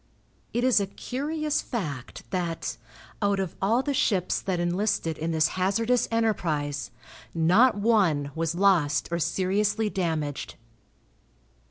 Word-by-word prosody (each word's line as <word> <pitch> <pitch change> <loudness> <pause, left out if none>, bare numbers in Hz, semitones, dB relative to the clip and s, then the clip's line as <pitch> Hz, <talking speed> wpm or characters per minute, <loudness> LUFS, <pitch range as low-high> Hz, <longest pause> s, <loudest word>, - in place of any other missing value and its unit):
It 240 - -1
is 255 -4 +5
a 200 - -1
curious 300 +8 -2
fact 150 - -5
that, 170 -3 -2 0.5
out 200 -1 +2
of 190 -4 -3
all 225 +7 +2
the 285 - -1
ships 190 -8 +1
that 185 -2 -2
enlisted 175 -2 0
in 160 +2 -3
this 160 -1 +2
hazardous 225 +6 +1
enterprise, 155 - -1 0.5
not 185 +10 +5
one 190 -10 +2
was 165 +1 -1
lost 175 -7 +2
or 170 - 0
seriously 210 +5 0
damaged. 160 -7 -2
190 Hz, 125 wpm, -26 LUFS, 165-220 Hz, 0.5 s, is